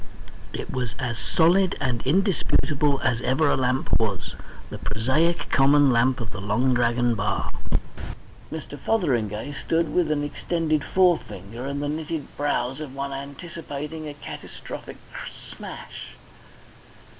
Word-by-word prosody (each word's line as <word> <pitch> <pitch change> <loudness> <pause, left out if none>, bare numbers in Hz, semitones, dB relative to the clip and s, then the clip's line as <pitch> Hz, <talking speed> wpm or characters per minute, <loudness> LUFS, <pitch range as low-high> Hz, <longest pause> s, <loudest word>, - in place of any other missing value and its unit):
It - - -5
was 125 -2 -2
as 120 -3 -2
solid, 180 +3 +3
as 125 -3 +1
indisputable 150 -4 +2
as 125 -3 +1
ever 135 +5 +3
a - - +4
lamp 130 0 +1
was, 105 -4 -1 0.4
the - - -5
prosaic 130 +11 +1
common 140 0 +6
lamp 125 +2 +3
of 115 -3 -4
the 95 - -6
Long 115 +6 +2
Dragon 120 0 +3
bar. 110 - -1 1.0
Mr. 150 -2 -6
Fotheringay 125 - 0
stood 165 +2 0
with 175 -3 +3
an 150 -1 +1
extended 155 0 0
forefinger 130 - +1
and 140 +1 -2
the - - 0
knitted 155 +1 -3
brows 135 -2 0
of 145 -4 -6
one 140 0 -3
anticipating 150 +2 -6
a 145 - -6
catastrophic 145 - -8 0.3
smash. - - -9
140 Hz, 130 wpm, -25 LUFS, 125-155 Hz, 1.0 s, common